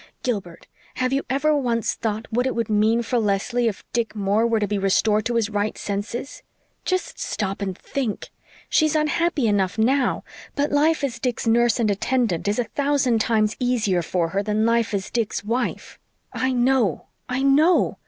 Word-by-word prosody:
Gilbert, 200 Hz, -9 st, -3 dB, 0.3 s
have 255 Hz, 0 st, 0 dB
you 275 Hz, -, +1 dB
ever 295 Hz, +4 st, +2 dB
once 240 Hz, -5 st, 0 dB
thought 220 Hz, 0 st, -3 dB
what 245 Hz, +3 st, +1 dB
it 260 Hz, -, -2 dB
would 230 Hz, -2 st, -2 dB
mean 220 Hz, +3 st, +3 dB
for 240 Hz, +1 st, 0 dB
Leslie 225 Hz, +3 st, 0 dB
if 210 Hz, -, -3 dB
Dick 230 Hz, -2 st, -1 dB
Moore 205 Hz, +3 st, +1 dB
were 230 Hz, -1 st, +1 dB
to 210 Hz, -, +1 dB
be 205 Hz, 0 st, -2 dB
restored 210 Hz, +2 st, +2 dB
to 240 Hz, -, -1 dB
his 225 Hz, -2 st, 0 dB
right 205 Hz, 0 st, -1 dB
senses? 210 Hz, +6 st, -4 dB, 0.4 s
Just 370 Hz, 0 st, -2 dB
stop 200 Hz, 0 st, -3 dB
and 190 Hz, -2 st, -3 dB
think! 255 Hz, -7 st, -4 dB, 0.4 s
She's 310 Hz, -1 st, +2 dB
unhappy 305 Hz, -2 st, +1 dB
enough 200 Hz, -3 st, +1 dB
now; 250 Hz, +3 st, +2 dB, 0.3 s
but 285 Hz, 0 st, 0 dB
life 300 Hz, +1 st, +2 dB
as 270 Hz, -4 st, -2 dB
Dick's 250 Hz, -2 st, -2 dB
nurse 235 Hz, +2 st, +3 dB
and 220 Hz, -3 st, +2 dB
attendant 215 Hz, -3 st, 0 dB
is 205 Hz, -, +1 dB
a 245 Hz, -, +2 dB
thousand 275 Hz, -4 st, +1 dB
times 215 Hz, -1 st, +1 dB
easier 225 Hz, -8 st, +1 dB
for 170 Hz, 0 st, -1 dB
her 195 Hz, +3 st, 0 dB
than 210 Hz, +1 st, 0 dB
life 230 Hz, -2 st, +1 dB
as 195 Hz, 0 st, -4 dB
Dick's 225 Hz, -3 st, -1 dB
wife. 235 Hz, +4 st, -3 dB, 0.3 s
I 260 Hz, 0 st, 0 dB
know 245 Hz, -, +1 dB, 0.2 s
I 255 Hz, +2 st, -1 dB
KNOW! 300 Hz, +6 st, +3 dB
230 Hz, 180 wpm, -23 LUFS, 210-260 Hz, 0.4 s, mean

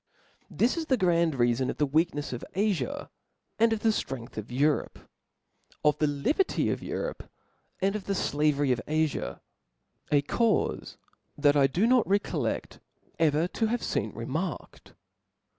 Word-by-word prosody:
This 245 Hz, +8 st, +1 dB
is 325 Hz, -1 st, -3 dB
the 260 Hz, -, +3 dB
grand 170 Hz, -, +2 dB
reafon 120 Hz, +1 st, +1 dB
of -, -, -3 dB
the 150 Hz, -, +2 dB
weaknefs 145 Hz, 0 st, 0 dB
of 125 Hz, -, -6 dB
Afia, 190 Hz, -, -1 dB, 0.5 s
and 230 Hz, 0 st, +5 dB
of 220 Hz, -1 st, -1 dB
the 225 Hz, -, +3 dB
ftrength 130 Hz, -, -3 dB
of 110 Hz, +2 st, -6 dB
Europe; 145 Hz, +4 st, +1 dB, 0.9 s
of 150 Hz, -1 st, +3 dB
the 150 Hz, -, +3 dB
liberty 145 Hz, -, +1 dB
of -, -, -3 dB
Europe -, -, -5 dB, 0.5 s
and 195 Hz, +1 st, +2 dB
of 210 Hz, -, -4 dB
the 195 Hz, -1 st, -1 dB, 0.2 s
(lavery 145 Hz, -2 st, +2 dB
of 125 Hz, -2 st, 0 dB
Afia: 155 Hz, -, -1 dB, 0.7 s
a 145 Hz, -1 st, +4 dB
caufc 230 Hz, +8 st, 0 dB, 0.4 s
that 145 Hz, 0 st, +4 dB
I 140 Hz, -2 st, +5 dB
do 175 Hz, +11 st, +1 dB
not 250 Hz, -1 st, +4 dB
recolleft 200 Hz, +1 st, -1 dB, 0.4 s
ever 160 Hz, +1 st, +3 dB
to 225 Hz, -, 0 dB
hare 235 Hz, +2 st, +1 dB
fcen -, -, -2 dB
remarked. -, -, -5 dB
155 Hz, 150 wpm, -28 LUFS, 140-210 Hz, 0.9 s, and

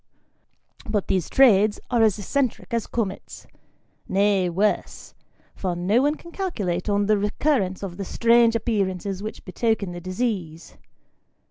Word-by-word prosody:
But 205 Hz, -3 st, -1 dB
these 185 Hz, -4 st, 0 dB
trades 215 Hz, -5 st, +4 dB
are 240 Hz, -2 st, +3 dB
as 220 Hz, -3 st, +3 dB
eccentric 255 Hz, +3 st, -2 dB
as 230 Hz, -2 st, -1 dB
comets; 205 Hz, -5 st, -4 dB, 0.6 s
nay, 195 Hz, -2 st, +2 dB
worse, 200 Hz, +5 st, -1 dB, 0.4 s
for 185 Hz, -2 st, -3 dB
no 195 Hz, +8 st, +2 dB
one 290 Hz, +2 st, +2 dB
can 340 Hz, +2 st, -13 dB
calculate 210 Hz, -, -3 dB
on 205 Hz, 0 st, +2 dB
the 210 Hz, 0 st, +2 dB
recurrence 205 Hz, -2 st, 0 dB
of 180 Hz, -3 st, -6 dB
the 200 Hz, -, -4 dB
strange 230 Hz, +2 st, +3 dB
appearances 200 Hz, -4 st, -1 dB
which 215 Hz, +1 st, -7 dB
betoken 210 Hz, 0 st, -1 dB
the 175 Hz, -, -7 dB
disease. 185 Hz, -4 st, -4 dB
205 Hz, 135 wpm, -24 LUFS, 185-230 Hz, 0.6 s, trades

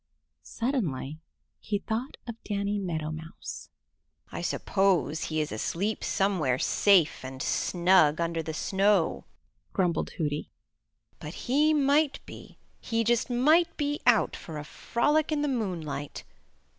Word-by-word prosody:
Suddenly 165 Hz, -, -3 dB, 0.4 s
he 210 Hz, -, -2 dB
thought 225 Hz, +6 st, -4 dB
of 235 Hz, -, -5 dB
Danny 205 Hz, 0 st, -1 dB
Meadow 160 Hz, -5 st, -3 dB
Mouse. 160 Hz, +1 st, -8 dB, 0.6 s
"I -, -, -5 dB
suppose 175 Hz, -3 st, +1 dB
he 155 Hz, 0 st, -2 dB
is 150 Hz, -, -3 dB
asleep 185 Hz, -, -2 dB
somewhere 180 Hz, -11 st, +1 dB
safe 180 Hz, -1 st, +3 dB
and 130 Hz, 0 st, -7 dB
snug 170 Hz, 0 st, +3 dB
under 165 Hz, -1 st, -1 dB
the 160 Hz, 0 st, -5 dB
snow," 195 Hz, -1 st, +1 dB, 0.5 s
grumbled 175 Hz, -4 st, 0 dB
Hooty, 150 Hz, -2 st, -2 dB, 0.7 s
"but 150 Hz, +3 st, -8 dB
he 295 Hz, +5 st, +4 dB
might 285 Hz, +1 st, +3 dB
be, -, -, -12 dB, 0.2 s
he 230 Hz, -1 st, -1 dB
just 235 Hz, +2 st, +1 dB
might 310 Hz, +8 st, +3 dB
be 290 Hz, 0 st, -1 dB
out 235 Hz, -3 st, +4 dB
for 160 Hz, -2 st, -8 dB
a 150 Hz, -, -5 dB
frolic 295 Hz, -, 0 dB
in 295 Hz, -1 st, 0 dB
the -, -, +1 dB
moonlight. 175 Hz, -, -3 dB
195 Hz, 130 wpm, -28 LUFS, 155-240 Hz, 0.7 s, he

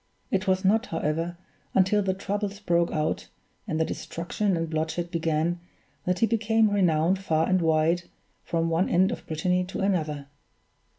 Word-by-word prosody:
It 195 Hz, +1 st, 0 dB
was 190 Hz, +1 st, +2 dB
not, 220 Hz, +5 st, +3 dB
however, 165 Hz, +2 st, -2 dB, 0.4 s
until 195 Hz, +2 st, +4 dB
the 190 Hz, -1 st, 0 dB
troubles 200 Hz, +1 st, -3 dB
broke 170 Hz, -4 st, +2 dB
out, 155 Hz, -1 st, -1 dB, 0.4 s
and 160 Hz, -5 st, -1 dB
the 160 Hz, -, +3 dB
destruction 175 Hz, +5 st, -2 dB
and 165 Hz, 0 st, -1 dB
bloodshed 160 Hz, +2 st, -2 dB
began, 165 Hz, 0 st, 0 dB, 0.5 s
that 180 Hz, 0 st, +1 dB
he 225 Hz, -, +4 dB
became 225 Hz, -1 st, +2 dB
renowned 180 Hz, -2 st, +2 dB
far 160 Hz, -4 st, +1 dB
and 185 Hz, -1 st, +2 dB
wide, 165 Hz, +2 st, +2 dB, 0.4 s
from 165 Hz, 0 st, 0 dB
one 165 Hz, +3 st, +2 dB
end 185 Hz, +2 st, +3 dB
of -, -, -6 dB
Brittany 180 Hz, +3 st, +1 dB
to 185 Hz, -, -6 dB
another. 155 Hz, -7 st, 0 dB
175 Hz, 160 wpm, -26 LUFS, 165-195 Hz, 0.5 s, until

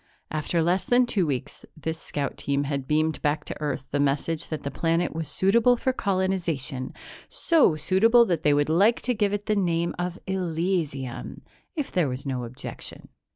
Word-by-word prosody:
After 155 Hz, +2 st, 0 dB
less 180 Hz, +3 st, +2 dB
than 245 Hz, +1 st, +4 dB
two 195 Hz, -8 st, 0 dB
weeks, 130 Hz, -4 st, -4 dB
this 160 Hz, +1 st, -4 dB
scout 140 Hz, -2 st, -3 dB
team 140 Hz, 0 st, -1 dB
had 140 Hz, -2 st, -3 dB
beamed 155 Hz, +1 st, +1 dB
back 150 Hz, +1 st, 0 dB
to -, -, -6 dB
Earth 145 Hz, -3 st, -2 dB
the 145 Hz, -, 0 dB
message 145 Hz, +4 st, 0 dB
that 155 Hz, -, -5 dB
the 140 Hz, -, -3 dB
planet 165 Hz, +1 st, 0 dB
was 160 Hz, -1 st, -3 dB
suitable 230 Hz, +6 st, +4 dB
for 260 Hz, +2 st, 0 dB
colonization, 175 Hz, -, -1 dB, 0.4 s
so 315 Hz, -, +3 dB
suitable 220 Hz, +10 st, +4 dB
that 170 Hz, -7 st, 0 dB
they 150 Hz, -, +3 dB
would 145 Hz, 0 st, +2 dB
like 195 Hz, +9 st, +3 dB
to 250 Hz, -, 0 dB
give 205 Hz, -3 st, +1 dB
it 205 Hz, 0 st, -2 dB
the 215 Hz, -, +1 dB
name 170 Hz, -3 st, +1 dB
of 180 Hz, 0 st, -2 dB
Elysium, 165 Hz, -7 st, -2 dB, 0.3 s
if 295 Hz, -4 st, -3 dB
there 170 Hz, -6 st, +1 dB
was 130 Hz, +3 st, -5 dB
no 130 Hz, -3 st, -2 dB
objection. 120 Hz, +2 st, -7 dB
165 Hz, 180 wpm, -26 LUFS, 145-190 Hz, 0.4 s, than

